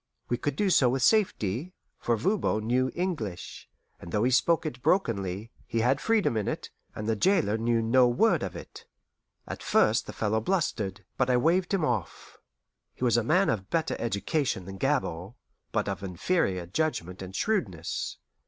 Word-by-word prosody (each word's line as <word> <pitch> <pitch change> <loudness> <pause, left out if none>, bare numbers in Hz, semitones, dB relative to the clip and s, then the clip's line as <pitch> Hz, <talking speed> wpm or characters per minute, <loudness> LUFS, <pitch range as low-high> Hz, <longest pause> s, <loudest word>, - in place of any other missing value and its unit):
We 120 - +1
could 145 +2 -2
do 195 +4 +1
so 130 -7 +5
with 130 0 0
safety, 180 - +1 0.2
for 120 -1 0
Voban 115 - 0
knew 130 +3 +2
English; 155 - -4 0.3
and 85 - -10
though 105 +3 +1
he 125 - +2
spoke 165 +6 +3
it 125 -5 -5
brokenly, 110 - 0 0.2
he 115 -1 0
had 130 +4 +2
freedom 220 - +2
in 105 -2 -1
it, - - -4 0.2
and 105 - -5
the 110 - +2
jailer 160 - +2
knew 115 0 +1
no 125 +2 +5
word 120 0 +3
of - - -4
it. - - -11 0.6
At - - -6
first 110 +2 +2
the - - -5
fellow 110 0 0
blustered, 105 - -1
but 125 -1 +1
I 125 - +4
waved 175 +7 +2
him 190 -6 +1
off. 110 - -4 0.6
He - - -7
was 120 -2 +3
a 120 - +3
man 180 - +3
of 95 -5 -1
better 160 -1 0
education 115 - -1
than 95 0 -8
Gabord, 120 - -1 0.4
but - - 0
of - - -3
inferior 95 - -1
judgment 90 - -2
and 95 0 -8
shrewdness. 100 - -2
120 Hz, 175 wpm, -28 LUFS, 105-155 Hz, 0.6 s, so